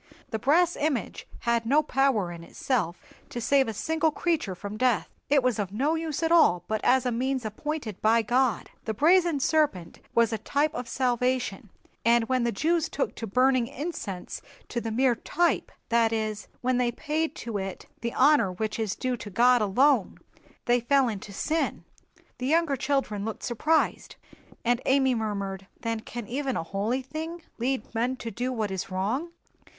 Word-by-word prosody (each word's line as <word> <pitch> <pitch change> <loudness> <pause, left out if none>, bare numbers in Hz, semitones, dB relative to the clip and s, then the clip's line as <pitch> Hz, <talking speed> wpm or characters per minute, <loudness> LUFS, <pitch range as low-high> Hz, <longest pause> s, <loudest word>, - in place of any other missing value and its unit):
"The 220 - -2
brass 335 +8 +3
image 290 -5 -2
had 235 -1 +1
no 285 +7 +3
power 265 -10 +1
in 170 -1 -9
itself 180 -4 -2 0.3
to 240 - -5
save 270 +2 +3
a 225 - -3
single 320 +7 +1
creature 310 - -1
from 200 +3 -7
death; 250 0 +1 0.2
it 280 -2 +4
was 250 -4 +1
of 195 -2 -2
no 275 +9 +1
use 320 -1 -2
at 325 - +1
all 240 - +5
but 220 0 -2
as 260 0 +4
a 250 - +1
means 255 +1 -1
appointed 220 -1 -4
by 225 +1 +4
God. 245 -1 +1
The 220 - -2
brazen 340 - +4
serpent 270 - 0 0.2
was 235 0 +4
a 220 - -2
type 285 +7 0
of 250 - -5
salvation; 250 -4 0 0.3
and 235 0 +4
when 255 -2 +1
the 235 - +1
Jews 325 +8 +1
took 275 - -2
to 225 - -6
burning 255 +3 +3
incense 260 - -5 0.3
to 240 - -2
the 225 - -3
mere 250 +3 +3
type, 345 +8 0 0.2
that 230 -2 +3
is, 215 -1 -2
when 250 0 +1
they 245 -1 +2
paid 310 +5 -2
to 225 -4 -4
it 190 -1 -6
the 235 0 -4
honor 290 -10 +5
which 215 +4 -3
is 215 -3 -1
due 255 -1 -2
to 210 - -8
God 245 +4 +4
alone, 240 +2 +3 0.5
they 245 0 +3
fell 265 +1 +3
into 205 -1 -6
sin." 315 +11 -1 0.6
The 255 - -2
younger 320 -1 +2
children 265 -6 -1
looked 220 0 -5
surprised; 305 +7 0 0.5
and 240 +1 +2
Amy 265 -1 +4
murmured, 200 -4 -3
"Then 230 -1 -2
can 235 +1 -7
even 270 +1 -2
a - - -2
holy 210 +9 -2
thing 320 +5 -6 0.2
lead 255 -1 -2
men 245 +3 0
to 230 -3 -6
do 245 +3 -2
what 220 -5 -2
is 190 -1 -4
wrong?" 215 - -1
245 Hz, 180 wpm, -27 LUFS, 220-280 Hz, 0.6 s, all